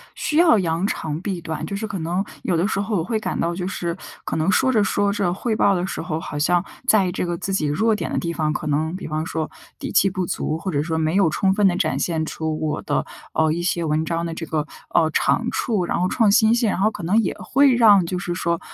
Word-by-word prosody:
需 305 - -1
要 335 -8 +6
扬 170 +1 0
长 155 -5 -3
避 190 -3 -3
短， 160 -1 -4
就 200 - -4
是 220 +2 -3
可 195 -4 -4
能 175 +4 -1 0.2
有 180 - 0
的 170 +4 +1
时 205 - -1
候 205 +2 -1
我 165 - 0
会 220 +5 -1
感 - - -3
到 170 +1 0
就 180 0 -3
是， 170 -3 -3 0.3
可 - - -3
能 160 +4 +1
说 260 +7 +3
着 215 -4 +3
说 200 0 +1
着 200 -4 0
汇 220 +4 -2
报 200 -2 +3
的 180 0 -1
时 - - -4
候， 160 -2 -3
好 145 - -6
像 175 +4 +2 0.2
在 195 -4 +4
这 180 - -2
个 175 -1 -2
自 195 - -3
己 175 -5 0
弱 215 +10 +2
点 - - -4
的 - - -1
地 170 - -2
方， 155 -2 -1
可 155 - -4
能 155 +3 0
比 190 - -6
方 155 +1 -2
说 160 -1 -3 0.3
底 - - -5
气 195 - +4
不 185 -1 -2
足， 155 -2 -2
或 185 +3 -4
者 145 -2 0
说 160 0 -2
没 160 +1 0
有 195 -4 +4
充 190 +5 +1
分 205 0 +3
地 180 - +2
展 175 -4 0
现 160 -2 -1
出 155 0 -3
我 155 -1 -2
的， - - -1 0.3
呃， 160 -1 +2
一 170 +2 -1
些 175 -1 0
文 155 0 0
章 165 0 -2
的 165 - -4
这 165 0 -5
个， 155 -2 -2 0.3
呃， 160 -2 +4
长 235 +8 +1
处， 210 -8 0
然 - - -1
后 180 - +2
创 220 0 +3
新 220 +2 +5
性 235 -2 +2
然 190 - -1
后 215 +3 +3
可 205 - -8
能 185 +6 +2
也 195 - -2
会 275 0 +3
让， 210 -6 +6
就 180 +1 -3
是 175 -1 -3
说， 170 0 -1
175 Hz, 290 characters per minute, -22 LUFS, 160-200 Hz, 0.3 s, 要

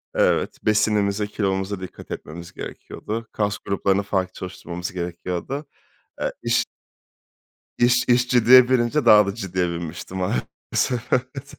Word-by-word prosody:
Evet, - - +2
besinimize, 105 -1 +2
kilomuza 95 -1 -2
dikkat 95 - -10
etmemiz 85 +3 -8
gerekiyordu. 110 +1 -6
Kas 105 -1 -1
gruplarını 100 0 0
farklı 95 -2 -1
çalıştırmamız 90 -1 -6
gerekiyordu. 90 - -4 0.6
Eee, - - 0
iş - - +2 1.1
iş 125 +1 +3
iş 125 0 +3
ciddiye 125 +1 +7
binince 130 +3 +2
daha 105 -1 +8
da 100 - -3
ciddiye 95 -4 -1
binmiştim 85 +2 -6
Maalesef. 95 - -2
Evet. 130 +2 -2
100 Hz, 120 wpm, -23 LUFS, 90-120 Hz, 1.1 s, daha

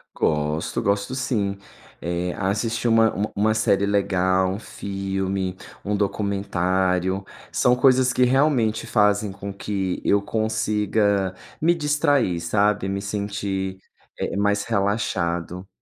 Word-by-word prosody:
Gosto, 75 +1 0
gosto 100 +4 0
sim. 110 -7 -1 0.4
Eh, 85 +1 -2
assistir 110 +4 -1
uma 115 -1 +4
uma 105 +3 -2
uma 110 +2 +2
série 100 -3 +2
legal, 95 -2 +2
um 100 - -4
filme, 95 -2 -3 0.3
um 105 +1 -1
documentário, 95 -2 0 0.3
são 125 - +3
coisas 130 0 +4
que 125 - +3
realmente 125 -4 +2
fazem 105 -2 +2
com 100 +1 -7
que 95 -2 -3
eu 100 - +3
consiga 105 -2 0 0.3
me 170 +2 +4
distrair, 145 - +1
sabe, 100 +2 +1
me 100 0 -2
sentir, 100 -2 -3 0.4
eh, - - -2
mais 100 0 +1
relaxado. 95 -4 -1
100 Hz, 120 wpm, -23 LUFS, 95-110 Hz, 0.4 s, uma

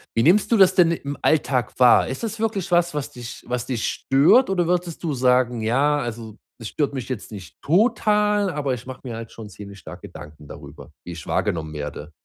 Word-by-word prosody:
Wie 115 - +2
nimmst 185 +7 +4
du 230 - +4
das 190 -2 +6
denn 170 -2 +5
im 145 -4 -4
Alltag 140 -5 +1
wahr? 125 -1 +6
Ist 130 - -6
das 225 -1 -4
wirklich 210 -5 -2
was, 175 -1 +2
was 145 -2 -4
dich 120 -1 -9
was 125 -1 -3
dich 125 -3 -3
stört 150 - +3
oder 180 -3 0
würdest 175 -1 -2
du 160 -3 -1
sagen: 125 -2 +2
„Ja, 140 +7 +1
also, 115 -4 -6 0.2
das 115 - -6
stört 145 -2 -2
mich 130 -2 -6
jetzt 125 -5 -6
nicht 95 -7 -10
total, 210 - +2
aber 145 -4 -2
ich 120 - -7
mache 130 -1 -9
mir 120 -4 -6
halt 115 -1 -9
schon 110 -2 -10
ziemlich 100 0 -11
stark 80 - -11
Gedanken 75 0 -12
darüber, - - -12
wie 90 - -7
ich 85 -3 -10
wahrgenommen 80 -2 -2
werde.“ 75 +1 -7
130 Hz, 210 wpm, -22 LUFS, 115-175 Hz, 0.2 s, das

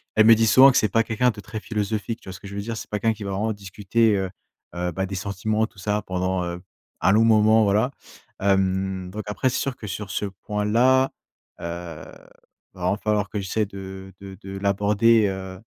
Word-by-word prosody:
elle 110 - +6
me 115 +1 +9
dit 115 0 +2
souvent 135 +4 +8
que 130 - +1
c'est 105 - +3
pas 115 +4 +3
quelqu'un 120 +3 +1
de 105 - -10
très 110 +2 -6
philosophique, 110 +1 -3
tu - - -11
vois - - -6
ce 95 - -10
que 100 - -10
je 100 - -8
veux 100 - -3
dire? 115 +2 -5
C'est - - -8
pas 105 - -2
quelqu'un 115 +2 +2
qui 105 - -8
va 100 - -4
vraiment 105 +3 -1
discuter, 105 +2 0
heu 95 -1 -2 0.5
heu, 90 0 -2
bah, 95 +3 -2
des 100 +1 -5
sentiments, 100 +3 -1
tout 105 - -14
ça, 105 +2 -1
pendant, 95 0 -1
heu, 85 0 -4 0.4
un - - +4
long 110 +3 +5
moment, 110 0 +5
voilà, 105 +5 +2 0.5
hem, 95 -1 0
donc, 105 +3 -6
après, 105 +5 0
c'est 125 - -2
sûr 135 -2 -2
que 105 - -9
sur 100 +1 -5
ce 105 - -2
point-là, 105 +7 +1 0.5
heu, - - -9
il 85 +2 -10
va - - -10
vraiment 90 +3 +1
falloir 105 -2 0
que 105 - -3
j'essaie 100 +3 -1
de 95 -1 -9
de 95 -1 -9
de 95 0 -7
l'aborder, 105 +3 +3
heu, 95 -1 -6
100 Hz, 225 wpm, -24 LUFS, 95-110 Hz, 0.5 s, me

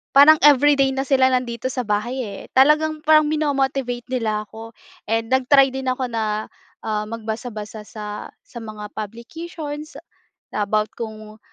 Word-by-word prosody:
parang 300 +3 +9
everyday 280 -1 +5
na 270 - 0
sila 265 -1 +3
nandito 250 -1 -1
sa 255 -1 -3
bahay, 230 +4 -1
eh, 200 -3 -7
talagang 305 +3 +4
parang 310 -1 +5
minomo-motivate 270 -5 -1
nila 220 -4 -1
ako 225 +1 -10 0.4
and 225 0 0
nag-try 265 +1 +4
din 265 -1 -2
ako 255 0 -2
na, 220 -2 -2 0.3
ah, 215 -1 -2
magbasa-basa 220 -1 -6
sa 210 -1 -8
sa - - -16
mga 215 -1 -7
publications, 290 - -7 0.5
na 205 -1 -1
about 215 +1 0
kung, 215 -1 -8
245 Hz, 140 wpm, -21 LUFS, 215-275 Hz, 0.5 s, parang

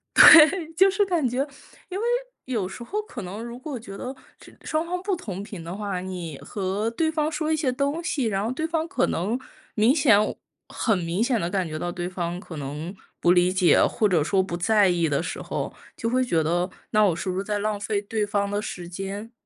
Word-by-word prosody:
对， 320 +1 +8
就 385 +2 +7
是 405 +1 +2
感 340 -8 +1
觉 255 +3 0 0.4
因 375 - -3
为 455 - -2 0.4
有 225 -8 -1
时 235 - -8
候 420 - -2
可 420 - -8
能 200 +5 -6
如 235 +1 -7
果 275 0 -5
觉 195 -4 -9
得 255 +5 -6 0.2
这 - - -15
双 315 +1 -1
方 360 +1 -3
不 400 - 0
同 200 - -6
频 200 -4 -8
的 170 +2 -6
话， 200 -3 -3
你 180 -5 -6
和 200 +2 -2
对 315 +6 0
方 310 -1 0
说 310 0 -2
一 - - +3
些 295 -4 0
东 280 +5 -1
西， 290 -6 -1
然 195 -3 0
后 - - -1
对 315 +5 -2
方 325 0 -1
可 375 - +1
能 200 +8 -1 0.4
明 225 +5 +4
显 275 -9 +5 0.5
很 220 -5 +1
明 170 +3 -2
显 240 0 +2
地 170 - -1
感 185 -1 -1
觉 155 -1 -5
到 175 +2 -3
对 175 0 -4
方 175 -1 -3
可 180 -3 -10
能 150 +6 -5 0.2
不 175 - +4
理 180 0 +4
解， 185 -4 +4
或 215 - +1
者 175 -6 +2
说 190 +5 +2
不 185 -2 -4
在 205 +3 +3
意 170 -3 +1
的 145 - +1
时 - - -5
候， - - -4 0.2
就 230 - -1
会 255 +2 +2
觉 170 -10 +1
得， 175 +4 0 0.2
那 215 0 +4
我 195 -4 +4
是 185 - -4
不 180 - -2
是 195 - -1
在 210 0 -2
浪 210 0 -1
费 205 0 -2
对 210 +1 -2
方 200 -1 0
的 205 +1 -1
时 175 -4 -6
间？ 195 +5 -6
205 Hz, 250 characters per minute, -25 LUFS, 180-270 Hz, 0.5 s, 对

